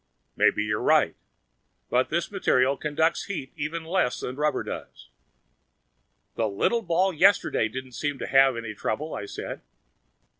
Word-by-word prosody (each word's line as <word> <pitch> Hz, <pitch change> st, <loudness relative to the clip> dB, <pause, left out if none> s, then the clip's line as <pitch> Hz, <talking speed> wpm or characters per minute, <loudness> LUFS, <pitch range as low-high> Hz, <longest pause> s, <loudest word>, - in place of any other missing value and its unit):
"Maybe 105 Hz, -, +3 dB
you're 105 Hz, 0 st, -1 dB
right. -, -, +3 dB, 0.8 s
But 125 Hz, +1 st, +2 dB
this 170 Hz, +4 st, -1 dB
material 135 Hz, -9 st, +2 dB
conducts 160 Hz, +3 st, 0 dB
heat 150 Hz, -10 st, -5 dB
even 160 Hz, +3 st, -4 dB
less 170 Hz, -7 st, 0 dB
than 125 Hz, -, -5 dB
rubber 150 Hz, +2 st, 0 dB
does." -, -, -8 dB, 1.2 s
"The -, -, 0 dB
little 230 Hz, -, +1 dB
ball 185 Hz, 0 st, +1 dB
yesterday 175 Hz, -, +3 dB
didn't 130 Hz, +3 st, -7 dB
seem 145 Hz, +3 st, -3 dB
to -, -, -5 dB
have 135 Hz, -2 st, +4 dB
any 115 Hz, -2 st, -5 dB
trouble," 145 Hz, +9 st, -3 dB
I 100 Hz, -, -5 dB
said. -, -, -6 dB
145 Hz, 145 wpm, -26 LUFS, 125-170 Hz, 1.2 s, have